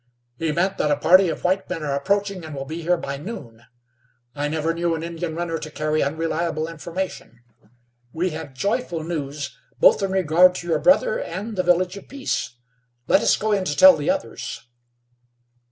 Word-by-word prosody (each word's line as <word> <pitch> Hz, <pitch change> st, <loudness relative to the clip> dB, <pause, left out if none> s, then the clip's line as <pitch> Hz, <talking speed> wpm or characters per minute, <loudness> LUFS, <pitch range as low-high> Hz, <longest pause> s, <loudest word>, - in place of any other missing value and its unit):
"He 165 Hz, +2 st, -1 dB
meant 185 Hz, +5 st, 0 dB
that 150 Hz, -, +1 dB
a 145 Hz, -, +2 dB
party 185 Hz, +5 st, +5 dB
of -, -, -5 dB
white 190 Hz, +2 st, 0 dB
men 170 Hz, -4 st, -4 dB
are 145 Hz, -2 st, -1 dB
approaching, 195 Hz, +5 st, -1 dB
and 155 Hz, -2 st, -7 dB
will 135 Hz, 0 st, -5 dB
be 160 Hz, +4 st, -6 dB
here 175 Hz, +2 st, +2 dB
by 140 Hz, -4 st, -5 dB
noon. 120 Hz, -, -9 dB, 0.7 s
I 145 Hz, 0 st, -2 dB
never 160 Hz, +2 st, -1 dB
knew 170 Hz, 0 st, 0 dB
an 160 Hz, -, -5 dB
Indian 165 Hz, -1 st, -4 dB
runner 165 Hz, -1 st, -2 dB
to 155 Hz, -, -7 dB
carry 155 Hz, 0 st, -1 dB
unreliable 160 Hz, +1 st, -1 dB
information. 165 Hz, -6 st, -6 dB, 0.7 s
We 175 Hz, +5 st, -1 dB
have 155 Hz, -4 st, -7 dB
joyful 175 Hz, -, -1 dB
news, 150 Hz, -3 st, -4 dB, 0.2 s
both -, -, +6 dB
in 195 Hz, -, 0 dB
regard 180 Hz, 0 st, +4 dB
to 175 Hz, -, -6 dB
your 160 Hz, -3 st, +1 dB
brother, 485 Hz, -, +3 dB
and 220 Hz, -, -5 dB
the 185 Hz, -, +1 dB
Village 180 Hz, +1 st, +1 dB
of 200 Hz, -, -12 dB
Peace. 270 Hz, -, -3 dB, 0.5 s
Let -, -, +4 dB
us -, -, +3 dB
go 215 Hz, +1 st, -1 dB
in 200 Hz, -2 st, +2 dB
to 150 Hz, -5 st, -2 dB
tell 280 Hz, -1 st, +9 dB
the -, -, -2 dB
others." 285 Hz, -, -3 dB
170 Hz, 185 wpm, -23 LUFS, 155-190 Hz, 0.7 s, tell